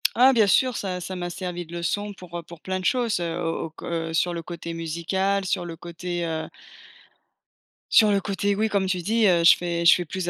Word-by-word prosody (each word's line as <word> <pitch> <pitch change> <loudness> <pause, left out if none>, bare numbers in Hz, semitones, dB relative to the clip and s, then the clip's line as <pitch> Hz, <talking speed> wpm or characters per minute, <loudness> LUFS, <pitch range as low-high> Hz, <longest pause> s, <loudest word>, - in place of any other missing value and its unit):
Ah 260 +3 +6
bien 225 -4 +5
sûr, 255 +5 +3
ça 185 -3 -3
ça 185 +1 -6
m'a 175 -1 -4
servi 175 0 -5
de 165 - -16
leçon 205 +5 -2
pour, 180 -3 -9
heu, 170 - -6
pour 170 0 -13
plein 185 +3 -3
de - - -7
choses, 235 -6 +1
heu, 170 -1 -3
au 165 0 -2
au - - -12
que 165 +1 -4
sur, 170 +2 +1
heu, - - -4
le 170 - -4
côté 170 0 -7
musical, 170 +4 -1
sur 185 -1 -1
le 170 -1 -7
côté, 175 +1 -5
heu 160 -1 -3 1.4
sur 215 - +7
le 200 -1 +2
côté, 200 +1 -1
oui 220 +2 0
comme 200 -2 +1
tu 185 -1 -1
dis, 220 +4 +2
heu, 175 -3 +3
je 165 - +9
fais 170 -1 -2
je 170 - +9
fais 175 - -1
plus 175 +2 -3
180 Hz, 240 wpm, -24 LUFS, 170-200 Hz, 1.4 s, je